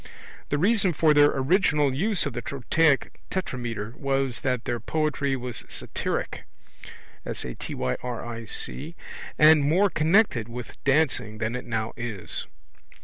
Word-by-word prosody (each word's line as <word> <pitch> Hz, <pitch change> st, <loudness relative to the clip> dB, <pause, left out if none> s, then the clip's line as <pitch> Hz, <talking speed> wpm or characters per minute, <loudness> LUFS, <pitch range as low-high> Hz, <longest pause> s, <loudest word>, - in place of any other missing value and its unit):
The 145 Hz, -, +1 dB
reason 195 Hz, +2 st, +3 dB
for 155 Hz, 0 st, +4 dB
their 145 Hz, 0 st, +6 dB
original 150 Hz, -1 st, +2 dB
use 195 Hz, +8 st, +1 dB
of -, -, -3 dB
the 120 Hz, -, -3 dB
trochaic 140 Hz, +4 st, +1 dB
tetrameter 120 Hz, -, -3 dB
was 135 Hz, -4 st, -1 dB
that 125 Hz, -2 st, -1 dB
their 120 Hz, -1 st, -1 dB
poetry 150 Hz, -2 st, 0 dB
was 125 Hz, -2 st, -4 dB
satyric -, -, -3 dB, 0.8 s
and -, -, -4 dB, 2.3 s
more 180 Hz, +8 st, +3 dB
connected 155 Hz, -, +3 dB
with 120 Hz, 0 st, -9 dB
dancing 135 Hz, -6 st, +1 dB
than 110 Hz, +2 st, -2 dB
it 125 Hz, -, -5 dB
now 110 Hz, -2 st, -2 dB
is. 110 Hz, -7 st, -5 dB
135 Hz, 115 wpm, -26 LUFS, 120-155 Hz, 2.3 s, their